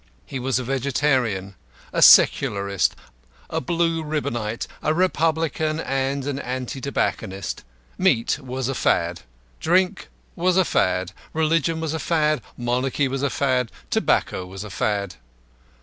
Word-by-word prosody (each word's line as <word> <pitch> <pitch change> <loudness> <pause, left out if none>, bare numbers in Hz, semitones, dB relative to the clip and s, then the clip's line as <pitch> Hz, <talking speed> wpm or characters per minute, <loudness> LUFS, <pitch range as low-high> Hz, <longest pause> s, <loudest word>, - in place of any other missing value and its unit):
He 135 - -5
was 130 +1 0
a 130 - -2
Vegetarian, 130 -6 0 0.4
a - - 0
Secularist, 100 -1 +5 0.6
a - - -1
Blue 165 +2 0
Ribbonite, 120 -8 -2 0.2
a 155 - +1
Republican, 160 -3 +1
and 135 -1 -1
an 140 -1 -2
Anti 130 +1 -4
tobacconist. 100 -8 -2 0.4
Meat 115 +5 +2
was 130 -2 -4
a 135 - -1
fad. 85 -8 +1 0.4
Drink 180 +2 +1 0.3
was 180 +1 +2
a 190 - +4
fad. 90 - +1 0.2
Religion 160 0 +1
was 160 -1 -2
a 160 - -2
fad. 155 -2 +1 0.2
Monarchy 125 +3 0
was 135 0 -3
a 140 - +1
fad. 130 -4 0 0.2
Tobacco 95 - +1
was 95 +2 -7
a 105 - -8
fad. 100 - -1
135 Hz, 135 wpm, -23 LUFS, 115-155 Hz, 0.6 s, Secularist